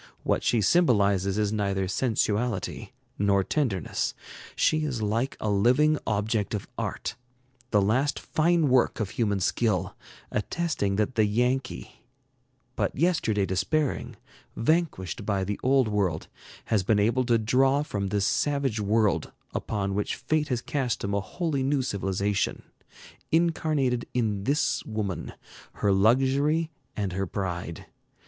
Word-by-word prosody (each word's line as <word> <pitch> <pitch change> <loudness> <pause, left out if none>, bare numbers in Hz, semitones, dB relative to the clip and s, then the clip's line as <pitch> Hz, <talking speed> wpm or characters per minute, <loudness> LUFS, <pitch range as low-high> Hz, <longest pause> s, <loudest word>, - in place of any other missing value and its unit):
What - - +1
she 115 - +2
symbolizes 100 - +3
is 105 0 +1
neither 100 -2 0
sensuality 105 -1 -1 0.3
nor 100 -1 +3
tenderness. 100 - -1 0.4
She 155 0 +2
is 130 -7 -2
like 115 +6 -1
a - - -3
living 130 +10 +3
object 105 0 0
of 100 - -5
art, - - -3 0.6
the 105 -4 +3
last 130 +8 +1
fine 165 0 +2
work 125 -1 +3
of 105 -4 -2
human 105 -4 0
skill, 95 -1 0 0.4
attesting 105 - -1
that 105 +5 0
the 110 -3 +3
Yankee, 125 +5 -1 0.7
but - - -1
yesterday 140 - +2
despairing, 95 +11 -1 0.4
vanquished 120 - 0
by 100 -2 0
the 100 +2 -3
Old 130 -1 +3
World, 95 -7 0 0.4
has 110 -3 +2
been 100 +3 +2
able 115 +5 +2
to 120 -1 +3
draw 135 +6 +2
from 100 -9 -3
this 100 0 0
savage 140 -5 0
world 105 0 +1 0.2
upon 100 -2 -2
which 105 +1 -1
fate 155 -1 0
has 125 -4 -2
cast 130 -2 -2
him 100 0 -2
a 100 - +1
wholly 155 - -2
new 135 0 +1
civilization, 100 -2 -1 0.7
incarnated 155 -7 +1
in 105 -5 0
this 145 +2 +1
woman, 105 -5 -4 0.4
her 100 - +1
luxury 135 +10 +3 0.3
and 100 -4 -2
her 95 +1 -2
pride. 85 -3 -4
110 Hz, 135 wpm, -27 LUFS, 100-135 Hz, 0.7 s, symbolizes